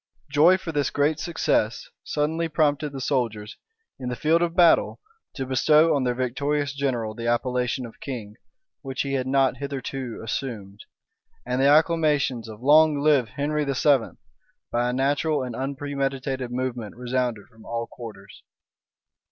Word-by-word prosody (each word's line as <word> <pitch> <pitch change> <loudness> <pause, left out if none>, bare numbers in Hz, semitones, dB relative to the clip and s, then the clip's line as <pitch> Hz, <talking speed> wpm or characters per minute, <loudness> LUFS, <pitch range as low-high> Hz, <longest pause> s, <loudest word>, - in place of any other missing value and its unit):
Joy 160 +6 +6
for 175 -3 -6
this 145 -2 0
great 145 +2 +1
success 120 -9 0 0.2
suddenly 160 +3 -1
prompted 150 -1 +1
the 135 - -6
soldiers, 115 -6 -2 0.4
in 125 -1 -4
the 125 - -3
field 160 +5 +2
of 170 -1 0
battle, 175 -2 +4 0.4
to 135 - -3
bestow 150 +5 +4
on 135 -3 +1
their 125 -1 0
victorious 140 +3 -1
general 125 -6 -2
the 115 +1 -5
appellation 125 +1 0
of 115 - -12
king, 110 -6 -6 0.5
which 135 -1 -3
he 140 -1 -3
had 130 -1 -1
not 135 0 +2
hitherto 135 -3 -5
assumed; 105 -4 -5 0.7
and 125 +1 -1
the 135 - +5
acclamations 150 -6 +2
of 110 +2 -11
"Long 150 +1 +5
live 140 -6 +3
Henry 150 +3 -1
VII.," 140 -2 +1 0.5
by 120 +1 +1
a - - -2
natural 145 +2 +1
and 125 -2 -5
unpremeditated 135 -1 -3
movement, 125 -3 -4
resounded 125 -3 -2
from 115 -2 -18
all 115 0 -3
quarters. 100 -5 -11
135 Hz, 150 wpm, -24 LUFS, 120-145 Hz, 0.7 s, Joy